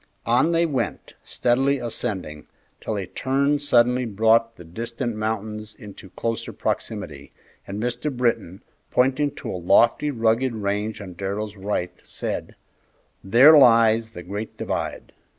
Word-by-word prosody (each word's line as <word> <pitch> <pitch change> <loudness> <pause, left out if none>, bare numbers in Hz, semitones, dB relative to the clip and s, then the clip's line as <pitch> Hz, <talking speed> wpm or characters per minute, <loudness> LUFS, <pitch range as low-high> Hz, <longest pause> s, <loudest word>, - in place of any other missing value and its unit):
On 125 +8 +3
they 170 0 +3
went, 145 -6 -3
steadily 135 +3 +1
ascending, 100 - -4 0.4
till 110 - -2
a 100 - -3
turn 140 +8 0
suddenly 125 -2 +3
brought 115 +2 +2
the 85 - -12
distant 115 +7 -5
mountains 110 0 -4
into 100 -4 -12
closer 115 +3 -4
proximity, - - -4 0.4
and 100 +1 -5
Mr. 125 +5 -2
Britton, 115 -7 -1 0.3
pointing 135 +3 +2
to - - -6
a 90 - -5
lofty, 115 - +3
rugged 115 0 +1
range 105 +1 -2
on 95 -3 -8
Darrell's 100 +3 -4
right, 95 -3 -3
said, - - -5 0.7
"There 125 +11 +7
lies 115 -4 +5
the 90 -6 -10
Great 100 +4 -6
Divide." - - -4
115 Hz, 135 wpm, -23 LUFS, 105-125 Hz, 0.7 s, There